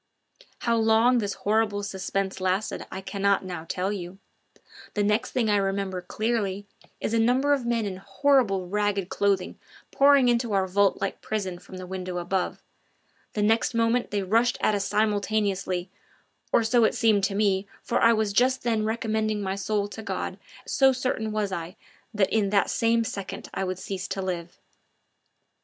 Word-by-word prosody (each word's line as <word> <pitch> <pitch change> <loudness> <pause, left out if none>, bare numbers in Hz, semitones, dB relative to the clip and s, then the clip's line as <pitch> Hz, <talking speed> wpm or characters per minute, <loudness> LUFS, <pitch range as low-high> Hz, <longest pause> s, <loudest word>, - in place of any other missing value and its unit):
How 235 -1 +1
long 225 +3 +4
this 200 -3 -2
horrible 210 0 0
suspense 195 0 -3
lasted 190 +3 -1
I 190 - -5
cannot 195 0 0
now 175 -3 -6
tell 190 +3 -1
you; 180 -1 -7 0.8
the 205 - +1
next 210 +1 +1
thing 245 -4 0
I 205 -1 +3
remember 195 -1 -1
clearly 205 0 -2 0.3
is 220 - -2
a 230 - +3
number 255 +5 +3
of 260 -4 -1
men 230 -2 +1
in 190 -2 -4
horrible 195 -1 +1
ragged 205 -1 -1
clothing 200 -1 0 0.3
pouring 280 -2 +5
into 235 -2 +1
our 195 -1 +2
vault 195 +1 +2
like 195 - -3
prison 190 -5 -3
from 185 - -11
the 185 - -7
window 185 -1 -5
above; 180 +1 -2 0.7
the 210 - 0
next 225 +2 +2
moment 230 +1 +1
they 205 -1 -1
rushed 230 +6 +2
at - - +2
us 200 -1 0
simultaneously 200 -3 0 0.6
or 230 - +4
so 235 +1 +3
it - - +3
seemed 215 -4 +3
to 195 - -2
me, 200 -1 +1 0.2
for 235 - 0
I 230 - +6
was 215 -3 +1
just 255 +3 +2
then 225 -3 +1
recommending 220 -1 -1
my 190 0 -1
soul 200 +1 -1
to 215 +2 -8
God, 220 - -4 0.3
so 270 -1 +4
certain 255 -4 -2
was 210 -2 -1
I 175 0 -5 0.4
that 205 -4 +1
in 210 -3 +2
that 200 0 +2
same 230 0 +2
second 200 -3 -6
I - - -2
would 185 -1 -3
cease 190 0 -5
to 195 - -3
live. 175 -2 -4
205 Hz, 175 wpm, -26 LUFS, 190-225 Hz, 0.8 s, I